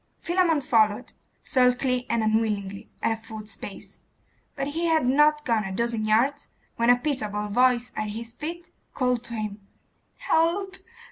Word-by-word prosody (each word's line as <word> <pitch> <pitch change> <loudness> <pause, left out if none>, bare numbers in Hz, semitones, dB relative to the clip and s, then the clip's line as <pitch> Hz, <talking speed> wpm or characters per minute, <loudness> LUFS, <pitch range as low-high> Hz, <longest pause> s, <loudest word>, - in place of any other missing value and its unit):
Philammon 345 -4 +2
followed, 220 -2 +2 0.3
sulkily 250 -1 +2
and 230 -1 +1
unwillingly, 210 -3 -1
at - - +2
a - - +1
foot's 220 -1 -8
pace; - - -9 0.6
but 275 0 -2
he 330 +4 -2
had 320 -4 +2
not 295 +3 +3
gone 230 -3 +1
a 195 - -5
dozen 230 +2 -1
yards 250 +7 +2 0.3
when 235 0 +2
a 245 - +7
pitiable 215 -7 -2
voice 245 +2 +2
at 215 0 -2
his 230 +2 -7
feet 335 +4 -7 0.2
called 250 -3 0
to 235 - -4
him 210 -2 -5 0.5
'Help! 380 -3 +1
245 Hz, 150 wpm, -25 LUFS, 215-290 Hz, 0.6 s, a